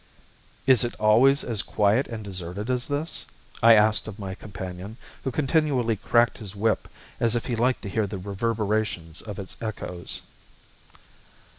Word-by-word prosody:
"Is 130 -3 +6
it 120 - -2
always 120 +7 +5
as 110 -4 0
quiet 105 +7 +2
and 110 -2 -6
deserted 95 +3 -4
as 125 0 0
this?" 145 +3 -2 0.3
I 115 0 +8
asked 105 0 +3
of 105 -2 -7
my 95 -3 -5
companion, 95 +1 -8 0.3
who - - -1
continually 135 -4 +1
cracked 115 +3 +2
his 105 -3 -6
whip 110 +2 0 0.3
as 115 0 +2
if 120 - -1
he 120 - -1
liked 125 +3 +1
to 100 - -4
hear 105 +1 0
the 100 0 -5
reverberations 100 -3 -2
of 105 -3 -7
its 95 -2 -7
echoes. 95 -5 -5
110 Hz, 155 wpm, -26 LUFS, 100-120 Hz, 0.3 s, I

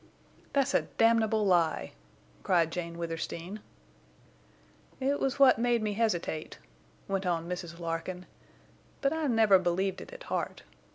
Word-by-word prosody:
"That's 275 -2 +2
a - - +4 0.2
damnable 225 -2 +3
lie!" 170 - +2 0.5
cried 165 - +2
Jane 170 -1 -4
Withersteen. 170 +3 -5 1.4
"It 275 +2 0
was 270 -1 0
what 270 -4 +6
made 240 -1 +2
me 210 -1 -1
hesitate," 175 - -1 0.5
went 195 -1 -1
on 170 -1 -1
Mrs. 175 -1 -5
Larkin, 170 +2 -4 0.8
"but 275 +1 +2
I 320 -2 -1
never 220 -6 +5
believed 185 +2 -1
it - - -10
at - - -10
heart. - - -3
190 Hz, 130 wpm, -30 LUFS, 170-230 Hz, 1.4 s, what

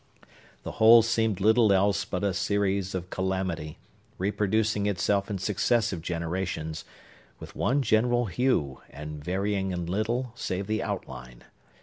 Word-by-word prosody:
The - - -5
whole 115 +1 +8
seemed 110 -3 0
little 110 +1 +4
else 100 +1 +2
but 90 -1 -4
a 100 -2 +1
series 100 0 0
of 90 0 -5
calamity, 95 -5 -3 0.4
reproducing 105 +2 0
itself 100 +1 0
in 100 - -2
successive 105 -1 0
generations, 85 -1 -4 0.5
with - - -11
one 140 +2 +1
general 120 +1 +2
hue, 100 - 0
and 75 0 -8
varying 95 +2 -1
in 90 -2 -3
little, 115 +7 -2
save 95 -3 -3
the 110 +2 -1
outline. 60 0 -6
100 Hz, 130 wpm, -27 LUFS, 90-110 Hz, 0.5 s, whole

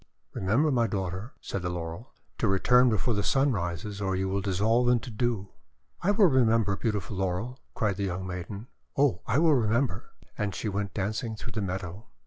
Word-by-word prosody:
:* - - -48
Remember, 120 +11 +2
my 120 -3 +3
daughter," 95 +3 -3
said 100 - -4
the 90 - -2
Laurel, 85 +6 -5 0.3
'to 115 - +2
return 125 +6 +5
before 110 +2 +1
the 105 - +1
Sun 135 +6 +3
rises, 100 +1 -3
or 95 -1 0
you 95 +1 0
will 100 +1 -1
dissolve 110 +6 +2
into 125 +1 +1
dew." 110 -3 -1 0.5
:<I 185 - +1
will 205 0 +5
remember, 115 - +3
beautiful 105 -1 -2
Laurel," 95 +8 -2 0.2
cried 105 -4 0
the 100 - -1
young 95 0 -3
maiden, 95 +4 -6 0.3
"oh, 140 -9 +3
I 115 - +2
will 160 0 +5
remember!" 120 +1 0 0.3
And 100 -3 -1
she 110 - -3
went 100 -1 -3
dancing 110 +3 -2
through 115 +2 -7
the 110 - -3
meadow. 95 +2 -4
105 Hz, 190 wpm, -28 LUFS, 95-120 Hz, 0.5 s, return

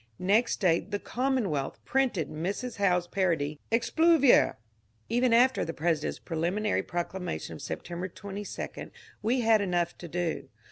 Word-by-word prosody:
Next 205 +6 +2
day 175 -4 +3
the 205 +4 -4
^* - - -27
Commonwealth 235 - -1
" - - -40
printed 255 - +1
Mrs. 195 +10 -4
Howe's 180 -3 +2
parody, 160 -6 0
" - - -38
Expluvior! 300 +4 +4 0.3
" 110 +1 -40
Even 245 0 +3
after 250 +3 +4
the 165 - -5
President's 160 -1 0
preliminary 180 +6 -1
proclamation 175 +1 -4
of - - -9
September 175 +1 -5
22 200 +2 -7 0.3
we 245 +4 +1
had 225 -2 +4
enough 175 -3 0
to 175 - -7
do. 170 0 -2
190 Hz, 150 wpm, -29 LUFS, 170-230 Hz, 0.3 s, Expluvior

